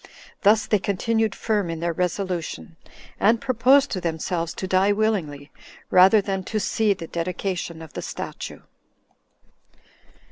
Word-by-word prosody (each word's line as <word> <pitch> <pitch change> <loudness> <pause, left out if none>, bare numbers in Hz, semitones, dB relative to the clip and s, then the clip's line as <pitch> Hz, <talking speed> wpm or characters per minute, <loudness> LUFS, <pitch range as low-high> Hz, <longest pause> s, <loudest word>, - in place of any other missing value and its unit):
31 - - -19 0.2
Thus 215 +1 +4
they 210 - +2
continued 215 +3 0
firm 210 -5 -1
in 165 -1 -4
their 170 0 -1
resolution, 180 -1 -3 0.4
and 225 +3 +4
proposed 260 +4 +3
to 185 - -2
themselves 165 0 -2
to - - -4
die 190 +2 +3
willingly, 175 -10 -1 0.4
rather 190 +3 +7
than 195 -1 -3
to 215 - -2
see 210 +1 +1
the 170 - -7
dedication 170 -1 -4
of 160 - -13
the - - -5
statue. - - -7
190 Hz, 140 wpm, -23 LUFS, 170-215 Hz, 0.4 s, rather